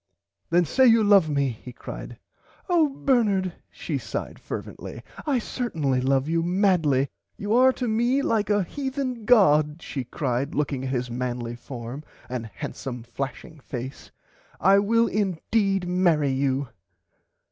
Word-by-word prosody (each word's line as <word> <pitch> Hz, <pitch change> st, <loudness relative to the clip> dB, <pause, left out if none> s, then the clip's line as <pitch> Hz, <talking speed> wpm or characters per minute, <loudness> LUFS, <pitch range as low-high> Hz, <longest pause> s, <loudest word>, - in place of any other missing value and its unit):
Then 175 Hz, +1 st, +4 dB
say 260 Hz, -, +4 dB
you 225 Hz, -1 st, +6 dB
love 200 Hz, -6 st, +5 dB
me 140 Hz, -2 st, +1 dB
he 125 Hz, +2 st, -8 dB
cried. 120 Hz, -, -8 dB, 0.5 s
Oh 340 Hz, -5 st, +3 dB
Bernard 215 Hz, -10 st, +1 dB, 0.2 s
she -, -, -4 dB
sighed -, -, -5 dB
fervently -, -, -7 dB, 0.2 s
I 280 Hz, -3 st, +2 dB
certinly 160 Hz, -, -1 dB
love 135 Hz, +1 st, +2 dB
you 165 Hz, +1 st, +1 dB
madly 170 Hz, -7 st, +2 dB, 0.3 s
you 205 Hz, 0 st, -2 dB
are 255 Hz, +2 st, +6 dB
to 250 Hz, -, -3 dB
me 240 Hz, +5 st, +2 dB
like 220 Hz, -5 st, +1 dB
a 205 Hz, -1 st, +3 dB
Heathen 265 Hz, 0 st, -4 dB
god 155 Hz, -10 st, +4 dB
she 135 Hz, -5 st, -5 dB
cried 130 Hz, +2 st, -2 dB
looking 140 Hz, -3 st, -1 dB
at -, -, -2 dB
his 125 Hz, -2 st, -2 dB
manly 120 Hz, -1 st, -3 dB
form 120 Hz, +3 st, -7 dB, 0.3 s
and 125 Hz, -3 st, -4 dB
handsome 120 Hz, +2 st, -6 dB
flashing 135 Hz, +6 st, -6 dB
face 130 Hz, 0 st, -7 dB, 0.5 s
I 195 Hz, +3 st, +5 dB
will 230 Hz, +3 st, +3 dB
indeed 195 Hz, -1 st, 0 dB
marry 170 Hz, -6 st, +2 dB
you. 135 Hz, 0 st, 0 dB
165 Hz, 140 wpm, -25 LUFS, 135-220 Hz, 0.5 s, you